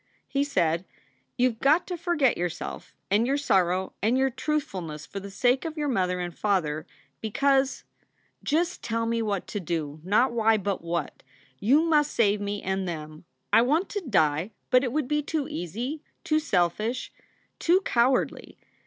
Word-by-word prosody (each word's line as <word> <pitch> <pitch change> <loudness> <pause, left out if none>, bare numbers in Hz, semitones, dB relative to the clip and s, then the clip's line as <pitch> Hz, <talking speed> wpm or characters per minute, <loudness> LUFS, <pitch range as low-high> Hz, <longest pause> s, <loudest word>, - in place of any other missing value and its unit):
He 280 0 +1
said: 175 - +1 0.5
"You 250 +1 +4
ve 225 - -14
got 300 +6 +4
to 360 - -4
forget 340 -7 +2
yourself 175 0 -5 0.2
and 215 +4 +3
your 275 +2 +2
sorrow 185 -8 +1
and 230 +5 +2
your 265 0 +2
truthfulness 185 - -3
for 200 - -6
the 200 +1 -8
sake 245 +6 +2
of 320 -1 -5
your 295 -1 -1
mother 180 -6 0
and 175 -1 -4
father, 160 -7 0 0.3
because 270 +4 +1 0.3
" - - -41
"Just 340 +4 +1
tell 230 0 -1
me 230 0 0
what 205 -4 -1
to 205 - -4
do 155 -4 -3
not 215 +8 +3
why, 225 -1 +3
but 200 -3 -2
what. 170 0 -3 0.4
You 270 +10 +4
must 300 -3 +2
save 205 -2 +3
me 205 0 -3
and 190 0 -1
them. 155 -1 -6 0.3
I - - +8
want 305 +10 +1
to 410 - -3
die, 165 - +1 0.2
but 255 0 +5
it 250 - -1
would 300 -1 -1
be 300 +1 +1
too 295 -1 -2
easy, 235 - -4 0.2
too 310 0 +2
selfish, 215 - 0 0.5
too 360 +3 +4
cowardly. 250 -6 +1
225 Hz, 170 wpm, -27 LUFS, 180-280 Hz, 0.5 s, I